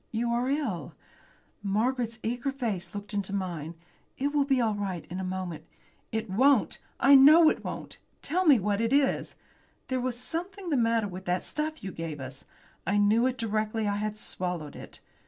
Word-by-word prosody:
You 235 +1 -1
are 240 +2 0
ill." 245 - -2 0.7
Margaret's 230 +3 0
eager 245 +4 -1
face 225 -7 -3
looked 205 +1 -6
into 200 -1 -2
mine. 170 -4 -4 0.4
"It 280 +2 0
will 290 -2 +3
be 270 -2 +2
all 225 -3 +2
right 195 -5 -4
in 180 - -4
a - - -3
minute." 185 -4 -4 0.4
"It 220 0 -2
won't! 220 - +3 0.2
I 275 - +6
know 305 +4 +9
it - - -5
won't! - - -6 0.2
Tell 365 +5 0
me 285 -4 +8
what 205 +2 0
it 230 +3 +1
is. 280 -1 +1 0.5
There 260 -1 0
was 250 -1 -2
something 350 +7 -5
the - - +3
matter 230 -3 +2
with 185 0 -8
that 180 +1 0
stuff 310 -2 -4
you 190 - -4
gave 165 -3 -5
us. 130 0 -9 0.4
I 200 - +2
knew 215 +4 +4
it 255 -1 -2
directly 215 -1 -1
I 205 0 0
had 215 0 -3
swallowed 180 -7 -4
it. - - -11
220 Hz, 185 wpm, -28 LUFS, 190-260 Hz, 0.7 s, know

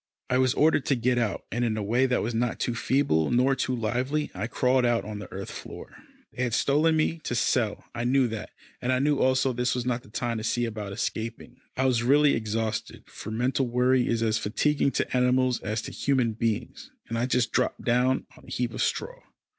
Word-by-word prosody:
I 125 - +3
was 130 +1 +2
ordered 150 -2 +3
to 140 - +3
get 125 0 +1
out, 110 -4 -1
and 120 +1 -1
in 110 -2 0
a 105 - -2
way 120 +6 +2
that 125 - +1
was 115 - -2
not 115 0 -1
too 120 - -1
feeble, 115 - +1
nor 125 +2 +3
too 130 -1 -1
lively, 125 +6 -1
I 100 +4 -3
crawled 125 +1 +2
out 120 -1 +1
on 105 -1 -6
the 105 - -9
earth 95 0 -6
floor. - - -9 0.4
They - - -5
had 125 -2 0
stolen 155 +5 +3
me 160 +1 0
to 125 - -4
sell. 110 -2 0
I 120 - -3
knew 130 +1 +3
that, 110 -1 -5 0.3
and 125 - 0
I 130 - +3
knew 145 +2 +2
also 130 0 +2
this 125 +1 0
was 125 -1 -2
not 125 -1 -1
the 105 - -18
time 115 +1 -2
to - - -6
see 120 +1 0
about 105 -3 -5
escaping. 115 +3 -4 0.2
I 130 - +1
was 125 -3 +2
really 145 +4 +4
exhausted, 110 0 -3
for - - -9
mental 125 +4 0
worry 125 +1 +2
is 115 -1 0
as 110 -1 +1
fatiguing 140 +7 +1
to - - -1
animals 125 0 +2
as 110 +1 -3
to - - -6
human 130 -5 +1
beings, 115 - -3 0.2
and 115 - -4
I 120 +2 0
just 125 -3 +1
dropped 125 - 0
down 125 +2 +2
on - - -17
a - - -11
heap 120 -2 -2
of - - -3
straw. - - -2
125 Hz, 225 wpm, -27 LUFS, 115-130 Hz, 0.4 s, really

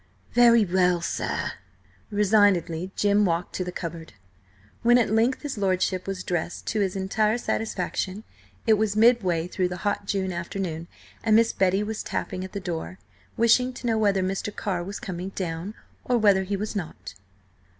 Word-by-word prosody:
"Very 235 -2 +6
well, 180 -1 +2
sir." 170 - -2 0.6
Resignedly 200 -4 +2
Jim 205 0 +3
walked 175 -2 -1
to 185 - -2
the 180 - -5
cupboard. 165 -5 -6 0.7
When 240 +1 +5
at 230 -4 +2
length 230 +6 +2
his 280 -7 -4
lordship 185 -1 0
was 190 -1 -3
dressed 175 -1 -3
to 220 - -1
his 195 -2 0
entire 210 +4 +1
satisfaction 205 -3 -2 0.4
it 220 -2 +4
was 215 -2 +1
midway 215 -8 +4
through 180 0 -1
the 180 0 -5
hot 205 0 -1
June 190 -2 -1
afternoon, 170 -1 -4 0.4
and 220 -1 +4
Miss 230 +1 +4
Betty 190 +2 +2
was 215 +1 -4
tapping 185 -2 -4
at 190 - -8
the 200 - -3
door, 175 0 -5 0.4
wishing 250 +3 +4
to 245 - -9
know 225 -2 +1
whether 200 -3 +2
Mr. 190 +2 -2
Carr 180 -4 -2
was 200 +3 -6
coming 185 -1 -5
down, 175 +3 -4 0.3
or 245 - +1
whether 200 -4 +4
he 200 +1 -2
was 210 +2 -4
not. 155 - -6
195 Hz, 170 wpm, -25 LUFS, 180-215 Hz, 0.7 s, Very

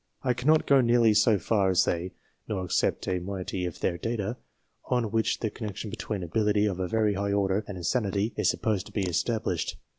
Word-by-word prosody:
I 125 -2 +2
cannot 150 +6 +3
go 140 -2 +5
nearly 120 -2 +4
so 105 0 +4
far 100 -1 +1
as 95 0 +3
they, 90 +2 -2 0.3
nor 95 -4 -2
accept 90 - 0
a 90 -1 0
moiety 95 0 -4
of 85 - -8
their 85 -2 0
data, 115 0 -2 0.5
on 120 -4 0
which 110 0 0
the 110 - -1
connection 105 -1 -6
between 105 -3 -4
ability 105 +4 +1
of 95 -3 -1
a 90 - -1
very 110 +1 +1
high 100 +1 -1
order 100 +1 +1
and 100 - -6
insanity 100 +4 0
is - - +2
supposed 105 -5 -1
to - - -13
be 100 - -1
established. 90 0 -1
105 Hz, 200 wpm, -27 LUFS, 95-115 Hz, 0.5 s, go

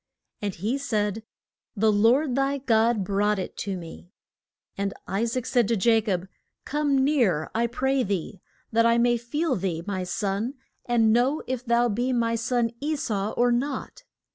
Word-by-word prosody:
And 205 -2 -3
he 220 +10 -2
said, 215 -5 -1 0.5
The 215 +1 +3
Lord 240 +7 +3
thy 275 +2 +1
God 230 -4 +2
brought 205 +2 +1
it 185 - -5
to 195 -2 -3
me. 170 0 -10 0.7
And 200 0 -2
I 200 +5 0
saac 235 +1 -2
said 245 -5 +2
to 230 - +1
Ja 225 +2 +3
cob, 190 -4 -2 0.4
Come 290 -1 +1
near, 235 - +1
I 235 +1 +1
pray 265 +3 0
thee, 195 -3 -3 0.3
that 230 0 +4
I 230 0 +4
may 240 0 +3
feel 280 +5 -1
thee, 175 -4 -2
my 190 -3 -2
son, 200 +7 -2 0.3
and 225 -2 +3
know 255 +6 +2
if 255 -1 -3
thou 235 0 +2
be 240 +4 0
my 230 -1 +1
son 230 0 0
E 305 +2 -1
sau 215 -7 -2
or 245 0 +2
not. 260 +3 -3
230 Hz, 170 wpm, -25 LUFS, 205-255 Hz, 0.7 s, that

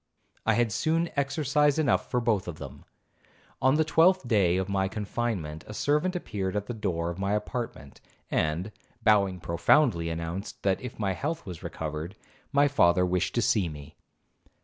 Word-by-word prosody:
I 110 - +4
had 120 -2 +2
soon 165 +8 0
exercise 145 +1 +2
enough 145 -7 +1
for 125 - +1
both 110 -6 0
of 85 -3 -5
them. - - -10 0.8
On 130 +2 +4
the 160 - +3
twelfth 165 0 +4
day 95 -6 +3
of 95 0 -1
my 95 -1 0
confinement, 100 -6 -3
a 105 - -8
servant 150 - +1
appeared 100 - -3
at 105 -1 -1
the 120 - -5
door 85 -6 -2
of 85 - -8
my 100 +1 0
apartment, 105 - -4 0.3
and, 80 +7 0 0.3
bowing 100 -4 +3
profoundly, 85 - +2
announced, 85 +4 -5
that 95 -1 +1
if 125 - -7
my 100 -3 0
health 160 - -3
was 90 -5 -8
recovered, 80 +4 -5 0.4
my 145 0 +4
father 90 -10 +4
wished 90 0 -1
to 120 - +2
see 100 -5 +2
me. 75 0 -10
105 Hz, 170 wpm, -28 LUFS, 90-135 Hz, 0.8 s, I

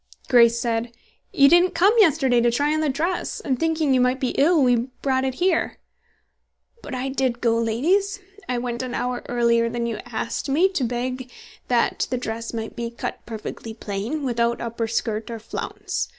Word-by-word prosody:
Grace 235 -2 +5
said, 235 0 -1 0.4
"You 275 - +6
didn't 350 +4 +4
come 395 +5 +5
yesterday 275 - +4
to 240 - +3
try 285 +6 +1
on 310 - 0
the 310 - +1
dress, 330 +7 -2
and 260 -5 -2
thinking 320 -3 +1
you 255 - +4
might 250 +1 +2
be 255 - 0
ill, 310 +1 +3
we 245 -1 +2 0.2
brought 260 -1 +1
it 260 -1 -2
here." 355 0 +1 1.0
"But 265 - -6
I 255 +1 -2
did 260 -2 -1
go, 230 -2 +2
ladies. 350 - +1 0.3
I 250 - 0
went 240 0 -3
an 255 -1 -4
hour 250 0 -2
earlier 235 -1 +2
than 235 0 -2
you 225 -2 -3
asked 235 +3 -3
me, 335 +8 +4
to 365 -8 -2
beg 250 +1 -3 0.4
that 240 -2 +1
the 255 - -1
dress 230 -1 -4
might 225 -1 -5
be 235 0 -3
cut 235 - -6
perfectly 220 0 -7
plain, 220 +8 -4
without 235 -2 0
upper 230 -1 -3
skirt 220 -1 -2
or 230 - -4
flounce. 225 - -4
245 Hz, 185 wpm, -23 LUFS, 235-280 Hz, 1.0 s, You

